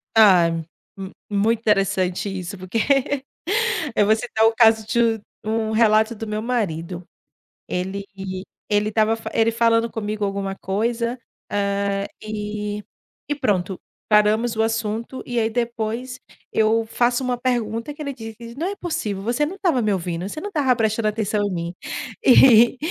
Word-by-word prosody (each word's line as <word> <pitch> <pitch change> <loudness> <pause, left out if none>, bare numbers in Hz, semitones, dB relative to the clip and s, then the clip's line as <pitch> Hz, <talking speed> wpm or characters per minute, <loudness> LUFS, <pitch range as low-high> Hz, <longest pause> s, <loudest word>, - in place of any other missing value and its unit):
Time, 175 -7 +5 0.3
mu 190 0 -7 0.2
muito 215 +2 +2
interessante 195 -3 +1
isso, 190 0 -5
porque 185 +5 -3 1.2
eu 205 - +4
vou 215 +2 +5
citar 220 0 0
o 225 - +4
caso 220 -2 +5
de 235 +1 0 0.4
u 215 - -4
um 220 0 0
relato 220 0 +4
do 225 +1 -6
meu 215 0 -2
marido. 180 -7 -2 0.6
Ele 190 +2 -3 0.7
ele 210 0 +2
estava 220 +1 +2 0.2
ele 225 0 +3
falando 230 0 +2
comigo 210 -2 -3
alguma 195 -1 -3
coisa, 230 +5 -1 0.3
hã, 200 0 0 0.2
e 210 -1 -4 0.5
e 290 - +2
pronto, 190 -7 -1 0.3
paramos 215 +2 +3
o - - +3
assunto, 225 +3 -2
e 245 -1 -1
aí, 225 0 +1
depois, 235 +1 -3 0.3
eu 220 +1 +3
faço 240 +3 +1
uma 250 -1 -1
pergunta 235 +1 -1
que 295 - -11
ele 280 -2 -3
diz: 230 -1 -9
"Não 325 +6 -2
é 400 - -3
possível, 215 - -3
você 245 +6 +1
não 345 - -5
estava 350 -10 +1
me 215 -2 +1
ouvindo. 175 -1 -3
Você 310 - -6
não 410 - -4
estava 280 -8 +2
prestando 220 -1 0
atenção 210 -1 -1
em - - -4
mim". 170 0 -3 0.5
E 245 -1 +7
220 Hz, 155 wpm, -22 LUFS, 200-235 Hz, 1.2 s, E